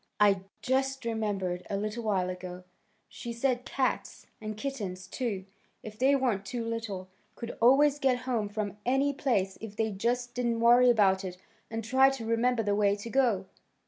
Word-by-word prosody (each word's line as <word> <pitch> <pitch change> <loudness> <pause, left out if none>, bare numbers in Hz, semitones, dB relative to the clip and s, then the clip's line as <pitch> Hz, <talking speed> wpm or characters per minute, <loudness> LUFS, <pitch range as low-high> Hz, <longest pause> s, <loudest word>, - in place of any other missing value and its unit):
I 200 -2 +4 0.2
just 270 0 0
remembered 205 -6 -1
a 200 - -1
little 215 +3 -3
while 190 -4 0
ago. 180 0 -8 0.4
She 235 - -7
said 245 +1 0
cats 265 -2 -2 0.2
and 215 -1 -5
kittens, 205 -8 -4
too, 200 -3 -3 0.4
if 215 0 -9
they 270 +2 +4
weren't 245 -7 0
too 230 +3 -4
little 225 -5 -4 0.3
could 235 0 -6
always 280 +4 +5
get 255 -3 +2
home 230 -5 -1
from 205 -1 -4
any 270 +3 +2
place 215 -10 0
if 215 -2 -8
they 220 0 0
just 240 +5 -1
didn't 235 -1 0
worry 240 +2 +6
about 195 -4 +4
it 180 -1 -6 0.3
and 225 0 -4
try 260 +4 +5
to 270 -4 -5
remember 230 +1 +1
the 205 -1 +1
way 200 -1 +3
to 210 +3 -8
go. 235 -8 +2
225 Hz, 175 wpm, -29 LUFS, 200-250 Hz, 0.4 s, worry